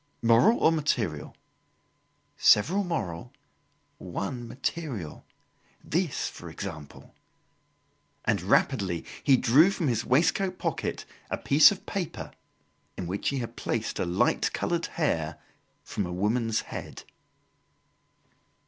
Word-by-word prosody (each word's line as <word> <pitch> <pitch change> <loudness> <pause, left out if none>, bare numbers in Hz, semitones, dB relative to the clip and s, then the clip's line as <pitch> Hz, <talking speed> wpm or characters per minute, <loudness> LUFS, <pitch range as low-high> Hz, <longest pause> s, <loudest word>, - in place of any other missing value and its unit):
"Moral 115 - +5
or 160 - +4
material?" 120 - -1 1.0
"Several 180 - +4
moral, 120 - -4 0.7
one 100 +7 -5
material. 125 - -5 0.6
This, 170 -3 -1
for 85 - -9
example." 80 -3 -8 1.1
And - - +1
rapidly 95 -9 +1 0.2
he 135 -3 +5
drew 135 +10 +5
from 170 -7 -1
his 115 - 0
waistcoat 180 +7 +2
pocket - - -3 0.2
a - - -1
piece 145 +6 +6
of 195 - -7
paper 185 -5 -4 0.7
in 90 - -4
which 95 +4 -2
he 140 - -2
had 120 -2 -5
placed 115 -1 -3
a - - 0
light 85 +1 +1
coloured - - -1
hair - - -1 0.5
from 100 - -3
a - - -6
woman's 110 +5 0
head. - - -8
120 Hz, 110 wpm, -27 LUFS, 95-155 Hz, 1.1 s, piece